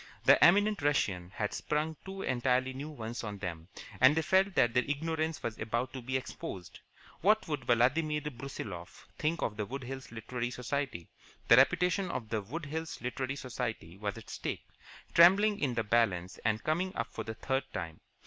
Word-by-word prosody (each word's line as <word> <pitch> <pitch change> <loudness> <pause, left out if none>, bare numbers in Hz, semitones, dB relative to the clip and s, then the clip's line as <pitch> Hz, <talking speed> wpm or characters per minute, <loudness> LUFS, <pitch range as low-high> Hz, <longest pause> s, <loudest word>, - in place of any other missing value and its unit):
The - - +7
eminent 205 +1 +5
Russian 95 -12 +1
had 105 -2 -2
sprung 155 +1 -1
two 195 0 -6
entirely 130 +1 +1
new 140 +4 -6
ones 120 -5 -6
on 105 -2 -5
them, 85 -4 -6 0.3
and 130 +4 +7
they 160 - +1
felt 190 +4 +3
that 120 0 +4
their 125 - +4
ignorance 160 +2 -2
was 115 -2 -4
about 120 +3 -2
to 130 - -5
be 130 +2 -1
exposed. 90 -8 -7 0.4
What 215 +4 +3
would 145 -6 -3
Vladimir 150 +6 +2
Brusiloff 120 -11 -7
think 160 +3 0
of 105 -2 -2
the 105 - -1
Wood 135 +3 -5
Hills 130 0 -7
Literary 115 +2 -4
Society? 125 - -3 0.4
The 115 - +9
reputation 180 +7 +3
of 115 -8 -4
the 110 -1 -1
Wood 145 - -6
Hills 160 +3 -4
Literary 130 +2 -3
Society 120 -10 -4
was 100 0 -4
at - - -10
stake, - - -4 0.5
trembling 200 +5 +6
in 130 -5 0
the 115 - +1
balance, 100 -5 +1
and 110 0 0
coming 175 +4 0
up 115 - -3
for 110 - -4
the 110 +1 -6
third 135 +3 -1
time. 80 -1 -5
130 Hz, 180 wpm, -32 LUFS, 110-155 Hz, 0.5 s, The